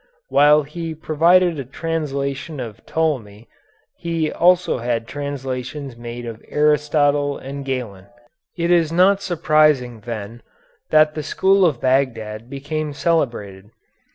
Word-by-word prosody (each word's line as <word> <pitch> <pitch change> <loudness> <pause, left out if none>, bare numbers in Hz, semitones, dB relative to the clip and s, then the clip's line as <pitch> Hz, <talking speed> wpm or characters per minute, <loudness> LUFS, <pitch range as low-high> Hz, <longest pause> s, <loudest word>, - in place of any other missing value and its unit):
While 150 +1 +5
he 160 +2 -6
provided 165 +2 +3
a - - -3
translation 140 0 -4
of 115 -5 -7
Ptolemy 120 -10 -2 0.5
he 165 -2 -2
also 180 -5 +3
had 120 -1 -2
translations 135 -1 -5
made 120 0 -7
of 115 -1 -8
Aristotle 150 -1 +2
and 140 +1 -7
Galen. 120 -8 -5 0.5
It 170 0 0
is 165 -3 +3
not 190 +3 +4
surprising, 155 - +2
then, 115 +1 -7 0.5
that 155 0 +4
the 155 - -4
school 190 +6 +2
of 155 -9 +2
Bagdad 115 -4 -1
became 145 +2 -4
celebrated. 115 - -1
145 Hz, 120 wpm, -20 LUFS, 120-160 Hz, 0.5 s, While